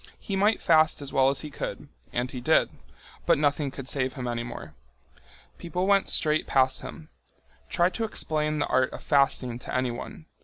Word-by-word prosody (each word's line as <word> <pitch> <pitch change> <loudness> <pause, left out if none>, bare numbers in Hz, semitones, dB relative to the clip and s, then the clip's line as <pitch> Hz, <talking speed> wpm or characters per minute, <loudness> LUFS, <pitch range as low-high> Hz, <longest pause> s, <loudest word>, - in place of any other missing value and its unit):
He 200 - -4
might 205 +3 +3
fast 155 -1 +4
as 140 - -8
well 135 0 +4
as 140 - 0
he 150 - -7
could—and 125 -2 -5
he 125 - -6
did—but 65 - 0
nothing 145 0 +1
could 135 -1 -9
save 130 -2 0
him 125 -3 -5
any 120 -1 -2
more. 120 0 -8 0.9
People 180 +2 -2
went 200 0 +3
straight 155 -1 +2
past 130 -1 +2
him. 155 -2 -10 0.6
Try 175 +1 +2
to 225 - -3
explain 155 -7 -1
the 145 - +1
art 130 0 +2
of - - -9
fasting 135 -4 +1
to - - -6
anyone! 130 +4 -3
140 Hz, 170 wpm, -26 LUFS, 130-155 Hz, 0.9 s, fast